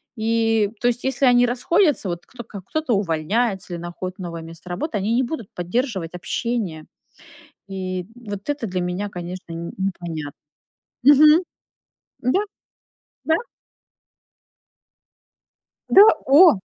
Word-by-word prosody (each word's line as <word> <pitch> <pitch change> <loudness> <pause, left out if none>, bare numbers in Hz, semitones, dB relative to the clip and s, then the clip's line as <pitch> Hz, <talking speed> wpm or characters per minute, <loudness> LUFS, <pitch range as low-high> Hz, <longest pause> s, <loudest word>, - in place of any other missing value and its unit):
И 225 -2 +1
то 245 - +2
есть 245 0 0
если 265 +1 +1
они 245 -1 +5
расходятся, 295 - +2
вот 175 0 -5
кто 250 -2 -10
ка 205 -3 -9
кто-то 305 - -2
увольняется 190 +2 0
или 170 - -4
находит 185 +2 -6
новое 170 -2 -6
место 165 +2 -12
работы, 230 - -3
они 210 +3 0
не 255 - +3
будут 240 -5 -5
поддерживать 185 - -2
общение. 180 -3 -3 0.8
И, 185 -1 -4 0.2
м, 245 - -15
вот 200 +3 -6
это 285 -5 -2
для 185 -2 -2
меня, 180 +3 -2
конечно, 180 -2 -7
н 165 +1 -6
непонятно. 170 -6 -4 0.7
Мгм. 300 +5 +7 0.8
Да, 255 +10 +2 0.9
да. 320 - +3 2.5
Да, 395 - +8 0.2
о. 295 - +7
205 Hz, 125 wpm, -22 LUFS, 180-245 Hz, 2.5 s, Да